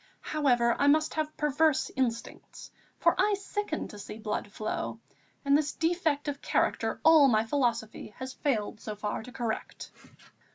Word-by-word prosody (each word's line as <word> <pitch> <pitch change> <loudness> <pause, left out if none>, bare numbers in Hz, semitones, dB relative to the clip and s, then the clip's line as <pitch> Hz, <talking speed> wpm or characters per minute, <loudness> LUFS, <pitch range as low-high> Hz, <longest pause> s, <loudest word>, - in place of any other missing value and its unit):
However, 245 -6 +3
I 285 - +3
must 310 +2 +3
have 310 -1 -3
perverse 300 0 +2
instincts, 235 -3 -4 0.3
for - - +4
I 415 -1 +3
sicken 400 -3 -4
to 210 - -10
see 210 - -8
blood 210 -2 -4
flow, 215 +1 -4 0.5
and 280 0 +4
this 290 -1 +1
defect 325 -3 0
of 285 -1 -3
character - - 0
all 315 -3 +8
my 220 -3 +3
philosophy 230 -5 -2
has 260 0 -6
failed 225 -7 -2
so 215 - -5
far 210 0 -3
to 250 - -11
correct." 235 -3 -4
270 Hz, 155 wpm, -29 LUFS, 225-310 Hz, 0.5 s, all